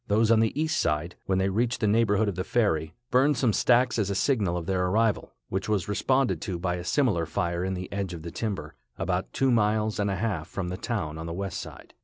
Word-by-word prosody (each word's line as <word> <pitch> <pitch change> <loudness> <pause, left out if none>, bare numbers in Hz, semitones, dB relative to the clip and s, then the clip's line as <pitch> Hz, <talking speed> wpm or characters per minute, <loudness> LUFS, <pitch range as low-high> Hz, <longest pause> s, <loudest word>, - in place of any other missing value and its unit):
Those 110 +2 +3
on 115 - +6
the 110 +5 +1
east 160 0 +1
side, 85 +2 -1
when 95 - +2
they 95 +1 +2
reached 120 +5 0
the - - +1
neighborhood 105 0 +3
of 100 - 0
the 90 - -3
ferry, 80 -10 0 0.2
burned 135 +2 +4
some 125 -4 +2
stacks 125 +1 +3
as 100 -2 0
a 100 - -1
signal 100 -7 +1
of 85 - -4
their 90 0 0
arrival, 110 +3 +1
which 95 +2 -2
was 100 -5 0
responded 105 - +1
to 95 -5 -3
by 90 +1 -1
a 85 - -6
similar 95 - +1
fire 85 -1 -1
in 95 0 -1
the 90 0 -5
edge 100 -3 -3
of 80 - -9
the 85 - -6
timber, 105 -4 -4 0.2
about - - -2
two 135 -1 +2
miles 110 -1 +1
and 100 -1 +1
a 95 - 0
half 95 -6 -2
from 90 -3 -4
the 90 - -3
town 90 -8 -3
on 80 - -5
the 85 - -4
west 100 0 -3
side. - - -11
100 Hz, 245 wpm, -27 LUFS, 90-115 Hz, 0.2 s, on